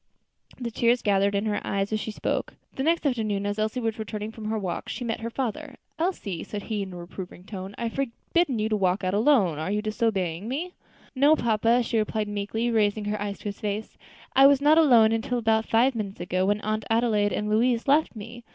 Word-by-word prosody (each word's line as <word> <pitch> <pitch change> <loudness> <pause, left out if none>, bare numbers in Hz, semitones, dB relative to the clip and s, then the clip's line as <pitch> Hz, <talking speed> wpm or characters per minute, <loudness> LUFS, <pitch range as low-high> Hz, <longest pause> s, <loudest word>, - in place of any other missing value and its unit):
The 240 -2 -4
tears 240 +2 +2
gathered 200 0 +2
in 200 +2 0
her 210 -1 -1
eyes 200 +1 -1
as 215 - +1
she 220 - -4
spoke. 210 - -3 0.2
The - - -4
next 330 +3 +1
afternoon, 215 -7 0
as 205 +1 -2
Elsie 220 +4 -1
was 225 -1 -2
returning 215 0 -4
from 220 -1 -9
her 220 +1 -1
walk, 185 -4 -4
she 250 - -4
met 230 -1 -2
her 230 +1 -4
father. 270 +4 -4 0.2
"Elsie," 315 - -2
said 205 -1 -6
he, 215 -2 -3
in 195 -1 -5
a 180 - -8
reproving 180 +1 -9
tone, 195 0 -7
"I - - -4
have 230 - -2
forbidden 275 +2 -1
you 215 0 0
to 215 - +1
walk 190 -1 +1
out 185 0 0
alone; 205 - +3
are 160 - -3
you 210 +1 -1
disobeying 210 -5 -1
me?" 320 +9 -3 0.4
"No, 285 +4 +5
papa," 230 0 +2
she 230 -1 0
replied 215 0 -1
meekly, 205 +3 -2
raising 210 -1 +1
her 210 0 -2
eyes 205 -1 -3
to - - -17
his 200 -1 -4
face, 210 0 -4 0.4
"I 270 +1 +8
was 280 -1 +5
not 300 +3 +5
alone 235 -8 +6
until 225 +2 -1
about 220 -1 +1
five 245 +4 +3
minutes 210 -4 -5
ago, 185 +1 0
when 205 +1 +1
Aunt 215 0 -2
Adelaide 225 -3 +2
and 210 - -2
Louise 230 +3 +2
left 290 -1 +3
me. 230 +3 -9
220 Hz, 225 wpm, -26 LUFS, 205-240 Hz, 0.4 s, I